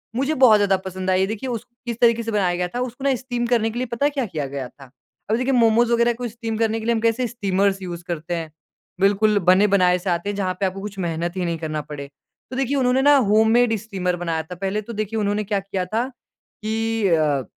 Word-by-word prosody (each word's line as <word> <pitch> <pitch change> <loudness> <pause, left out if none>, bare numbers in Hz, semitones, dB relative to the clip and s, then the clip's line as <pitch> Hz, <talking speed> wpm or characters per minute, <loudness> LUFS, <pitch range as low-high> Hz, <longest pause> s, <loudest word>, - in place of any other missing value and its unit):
मुझे 275 +5 0
बहुत 255 -6 +6
ज़्यादा 195 -2 +3
पसंद 185 0 -4
आई। 190 +1 +2
देखिए, 225 +4 -4
उस 230 -3 -4 0.2
किस 235 -1 -4
तरीके 230 -1 +4
से 225 - -3
बनाया 185 -4 +1
गया 180 0 -1
था 245 - -1
उसको 250 +2 -5
ना 270 -2 +3
स्टीम 245 -1 -3
करने 230 -2 +2
के 240 - -7
लिए 255 - -1
पता 280 - +1
है - - +4
क्या 265 - +1
किया 155 -8 -4
गया 135 -2 -5
था? 135 -3 -16 0.4
अब 220 - +3
देखिए 260 +2 0
मोमोज 235 0 +4
वगैरह 235 0 +3
को 240 +1 -5
स्टीम 225 -1 -5
करने 225 0 +1
के 220 - -7
लिए 235 - +2
हम - - 0
कैसे 230 +2 +1
स्टीमर्स 195 -3 0
यूज़ 175 -2 -6
करते 170 0 -3
हैं। 160 -2 -5 0.5
बिल्कुल 205 +1 +3
बने 190 +3 +6
बनाए 180 -3 +3
से 185 +1 -4
आते 170 +3 -1
हैं 205 - -3
जहाँ 185 -2 -1
पे 195 - +1
आपको 190 +1 -3
कुछ 205 -1 -7
मेहनत 170 +1 -2
ही 180 - -1
नहीं 170 -1 -1
करना 155 -2 -3
पड़े। 145 -2 -8 0.4
तो - - -5
देखिए 270 +1 0
उन्होंने 255 0 +2
ना 290 +1 +6
होम 220 +1 +4
मेड 240 -1 +4
स्टीमर 185 -4 -2
बनाया 165 -2 -2
था। 180 +3 -9
पहले 195 +3 -2
तो 230 +3 -8
देखिए 215 +1 -2
उन्होंने 205 +1 0
क्या 205 -1 -1
किया 195 -1 -3
था 225 +7 -1 0.6
कि 225 -1 0
अ 150 -6 +2
205 Hz, 250 wpm, -22 LUFS, 180-235 Hz, 0.6 s, बहुत